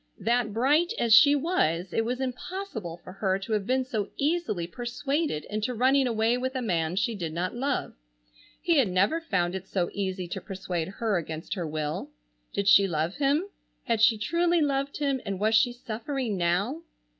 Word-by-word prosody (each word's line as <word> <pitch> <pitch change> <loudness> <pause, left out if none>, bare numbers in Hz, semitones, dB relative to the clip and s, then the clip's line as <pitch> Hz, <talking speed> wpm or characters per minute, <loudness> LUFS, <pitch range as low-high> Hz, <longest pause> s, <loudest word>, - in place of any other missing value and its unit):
That 235 0 +1
bright 290 - +2
as 230 -2 +3
she 285 +5 +8
was 190 - 0
it 225 - +1
was 250 +3 -2
impossible 255 - -5
for 185 - -10
her 190 -1 0
to 195 +3 -4
have 210 -2 -1
been 260 +1 +1
so 215 -5 -3
easily 290 - 0
persuaded 240 - -2
into 215 +4 -3
running 260 +3 +3
away 230 +1 +1
with 260 +1 -3
a 260 - -1
man 170 -5 0
she 210 +5 0
did 170 -6 -4
not 175 +3 -2
love. 265 +3 -2 0.7
He 340 -4 +3
had 255 - +4
never 195 - +2
found 180 - 0
it 190 0 -6
so 180 -3 -1
easy 190 -2 -3
to - - -4
persuade 185 -4 -4
her 205 +1 -1
against 160 -1 -5
her 175 -5 -3
will. 150 -1 -3 0.4
Did 200 0 -2
she 200 -1 +7
love 165 +1 -2
him? 285 +3 +2 0.4
Had 230 -2 0
she 225 0 +5
truly 340 +10 +1
loved 280 -2 0
him, 275 -3 0
and 195 -2 -4
was 215 +2 +2
she 225 +2 +4
suffering 240 0 -4
now? 190 - 0
220 Hz, 185 wpm, -27 LUFS, 185-270 Hz, 0.7 s, she